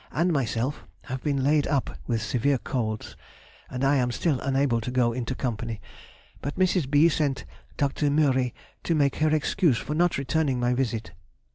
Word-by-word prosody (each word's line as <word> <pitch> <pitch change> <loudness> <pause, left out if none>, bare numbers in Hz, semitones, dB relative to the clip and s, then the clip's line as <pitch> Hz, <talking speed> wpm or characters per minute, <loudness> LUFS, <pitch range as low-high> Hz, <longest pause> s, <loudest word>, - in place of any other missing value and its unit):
and 170 +3 +1
myself 130 0 -1 0.2
have 130 -1 -5
been 140 -3 0
laid 145 +1 +3
up 140 -4 -1
with 115 -1 0
severe 130 +5 +1
colds, 110 -4 -3 0.5
and 130 +1 -4
I 140 +1 +4
am 125 -2 +1
still 145 +1 0
unable 135 -3 +1
to 115 - -4
go 125 -2 +2
into 125 +1 -3
company, 115 -3 -3 0.6
but 145 - -4
Mrs. 185 -6 +2
B. 145 +3 +5
sent 145 -4 0 0.3
Dr. 145 +1 0
Mühry 135 -4 +2 0.3
to 170 - +1
make 140 -3 +2
her 155 0 +2
excuse 155 -1 +2
for 150 - -4
not 175 +2 +2
returning 140 -1 0
my 120 0 +1
visit. 115 -6 -2
135 Hz, 170 wpm, -26 LUFS, 125-150 Hz, 0.6 s, B